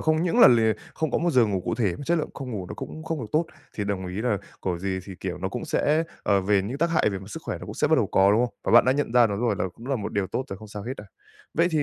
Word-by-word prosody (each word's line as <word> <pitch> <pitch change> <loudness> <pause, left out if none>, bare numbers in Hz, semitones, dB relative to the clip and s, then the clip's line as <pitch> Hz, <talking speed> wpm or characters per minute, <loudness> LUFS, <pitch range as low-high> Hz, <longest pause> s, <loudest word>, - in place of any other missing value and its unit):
không 155 0 +2
những 180 +7 +1
là - - +10
lìa 115 -2 +4 0.2
không 160 -2 -1
có - - +1
một 170 +2 +1
giờ 125 -6 +4
ngủ 95 -3 -1
cụ 95 - -2
thể 105 -7 0
mà - - -8
chất 170 +3 +2
lượng - - -3
không 135 -2 -6
ngủ 100 -6 -4
nó - - -6
cũng 155 - -8
không 160 -2 -3
được 115 - -5
tốt, 160 +2 +2 0.3
thì 105 - -2
đồng 95 -2 -2
ý 90 +3 -4
là 115 -5 +1 0.2
của 90 -2 -2
gì 95 0 -2
thì, 95 - -8
kiểu, 90 -1 -4
nó 95 +2 -2
cũng 100 - -5
sẽ, 155 +1 +1 0.2
ờ, 100 -2 +3
về 100 0 +2
những 125 +8 -4
tác 170 +1 +1
hại 160 - +3
về 95 - -3
mặt 95 +2 -11
sức - - -6
khỏe - - -4
nó - - -9
cũng - - -7
sẽ - - +1
bắt - - +5
đầu - - +2
có, 95 +1 +4
đúng 110 - +4
không? - - -13
Và - - 0
bạn 120 - +8
đã 130 - +4
nhận 140 -4 -1
ra 120 -1 +6
nó 100 -2 -2
rồi 115 -1 +1
là - - 0
cũng 115 - -12
là 135 -1 0
một 105 - -5
điều 100 -2 0
tốt 130 - -3
rồi 95 - -5
không 110 -1 -11
sao 105 0 -7
hết 125 +5 -4
đâu. 105 - -10 0.5
Vậy 170 +2 +3
thì, 155 -3 +2
115 Hz, 350 wpm, -25 LUFS, 100-150 Hz, 0.5 s, là